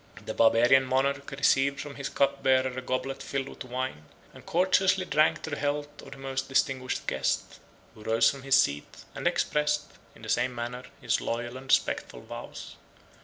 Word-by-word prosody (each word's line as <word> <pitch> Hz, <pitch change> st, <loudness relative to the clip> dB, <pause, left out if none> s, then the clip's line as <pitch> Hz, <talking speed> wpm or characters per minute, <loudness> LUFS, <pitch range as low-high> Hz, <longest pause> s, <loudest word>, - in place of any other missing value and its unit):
The -, -, -4 dB
Barbarian 120 Hz, +4 st, +5 dB
monarch 140 Hz, +2 st, 0 dB
received 140 Hz, 0 st, +2 dB
from 145 Hz, 0 st, -6 dB
his 140 Hz, -1 st, -5 dB
cup 140 Hz, -, +1 dB
bearer 130 Hz, -1 st, +2 dB
a 130 Hz, -, -4 dB
goblet 130 Hz, +1 st, -3 dB
filled 135 Hz, -1 st, -3 dB
with -, -, -9 dB
wine, 125 Hz, -11 st, -4 dB, 0.3 s
and -, -, -14 dB
courteously 185 Hz, +1 st, +2 dB
drank 155 Hz, -3 st, +2 dB
to 160 Hz, -, -5 dB
the -, -, -1 dB
health 145 Hz, +1 st, -3 dB
of 135 Hz, -, -11 dB
the -, -, -13 dB
most 135 Hz, 0 st, -4 dB
distinguished 130 Hz, -1 st, 0 dB
guest; 65 Hz, 0 st, -1 dB, 0.3 s
who 110 Hz, -, -15 dB
rose 115 Hz, +1 st, +3 dB
from 140 Hz, -, 0 dB
his 135 Hz, +1 st, +4 dB
seat, 70 Hz, +1 st, -1 dB
and -, -, -2 dB
expressed, 150 Hz, 0 st, +1 dB, 0.3 s
in -, -, -16 dB
the -, -, -7 dB
same 125 Hz, -1 st, +1 dB
manner, 120 Hz, +2 st, -5 dB, 0.2 s
his 120 Hz, -3 st, +1 dB
loyal 120 Hz, +1 st, -3 dB
and 130 Hz, +1 st, -9 dB
respectful -, -, +1 dB
vows. -, -, -9 dB
135 Hz, 180 wpm, -28 LUFS, 125-140 Hz, 0.3 s, Barbarian